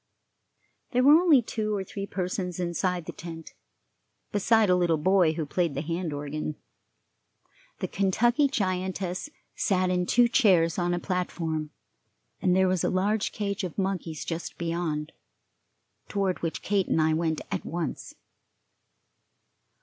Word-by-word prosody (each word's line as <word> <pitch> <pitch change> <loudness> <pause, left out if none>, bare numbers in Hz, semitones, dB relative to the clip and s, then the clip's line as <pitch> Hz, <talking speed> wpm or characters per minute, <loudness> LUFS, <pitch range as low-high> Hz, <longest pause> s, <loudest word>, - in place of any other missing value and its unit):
There 250 +1 +3
were 285 +3 +8
only 320 -6 +6
two 215 -1 -2
or 195 - -2
three 200 +1 -6
persons 180 -2 -3
inside 175 0 -1
the - - -5
tent, 165 -1 -9 0.8
beside 215 +2 +3
a 180 - +4
little 175 -3 +2
boy 180 0 +3
who 160 -1 -3
played 170 +1 -1
the 140 - -2
hand 170 +1 -3
organ. 145 +1 -4 1.3
The - - -1
Kentucky 240 +8 +2
giantess 185 -2 -2 0.3
sat 185 -2 +1
in 180 -1 0
two 240 0 +5
chairs 185 -9 +3
on 175 0 +1
a - - -2
platform, 165 -4 -2 0.7
and 180 -1 +3
there 190 0 +4
was 185 -2 +1
a - - +2
large 200 +3 0
cage 200 -1 -3
of 180 -4 -5
monkeys 185 -5 -2
just 165 0 -5
beyond, 165 -3 -2 1.0
toward 195 -3 -1
which 165 -1 -3
Kate 200 -2 +1
and - - +1
I 155 0 +3
went 160 -1 0
at - - -2
once. 170 -1 -4
180 Hz, 140 wpm, -27 LUFS, 165-200 Hz, 1.3 s, were